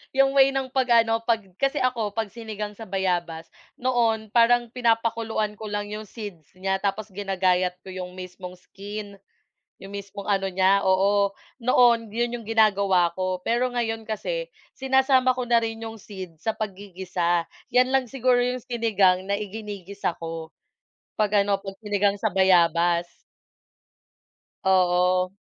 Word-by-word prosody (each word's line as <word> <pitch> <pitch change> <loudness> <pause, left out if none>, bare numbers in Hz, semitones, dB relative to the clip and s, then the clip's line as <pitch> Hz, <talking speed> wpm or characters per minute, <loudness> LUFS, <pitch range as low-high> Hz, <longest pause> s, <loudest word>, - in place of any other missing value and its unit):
'yung 270 0 +4
way 270 0 +6
ng 265 -1 -2
'pag 245 -3 +4
ano 225 0 0
'pag 230 -1 +2 0.2
kasi 275 +2 +1
ako 235 -5 0
'pag 220 -3 -2
sinigang 215 -2 -6
sa 225 - -9
bayabas 175 -4 -2 0.3
noon 235 -3 +1
parang 240 0 +4
pinapakuluan 225 -3 0
ko 215 +1 -8
lang 205 0 -2
'yong 215 +1 -5
seeds 200 -9 -9
niya 190 +1 -1
tapos 205 +2 -1
ginagayat 185 -2 0
ko - - -16
'yong 185 -1 -6
mismong 180 0 -8
skin, 205 +1 -8 0.6
'yong 195 - -10
mismong 200 0 -7
ano 195 -2 +1
niya, 190 +2 +3
oo. 200 +1 +3 0.3
Noon 240 -2 +4
'yon 235 +2 -1
'yong 230 -3 -9
ginagawa 200 -5 +3
ko, 185 -1 -2
pero 245 +2 +1
ngayon 225 -2 -2
kasi - - -3 0.3
sinasama 265 -1 +3
ko 250 - -2
na 235 -1 +5
rin 225 0 -4
'yong 225 0 -6
seeds 185 -6 -10
sa 220 - +1
paggigisa, 185 -4 -2 0.3
'yan 250 +1 +4
lang 265 -2 +2
siguro 255 -2 +2
'yong 250 0 -1
sinigang 200 -6 +2
na 200 - +1
iginigisa 205 -2 -5
ko 165 -1 -6 0.7
'pag 210 -1 +3
ano, 200 0 0
'pag 195 0 -9
sinigang 205 -1 +1
sa - - 0
bayabas. 175 -2 +3 1.6
Oo. 180 -1 +3
205 Hz, 145 wpm, -25 LUFS, 185-230 Hz, 1.6 s, way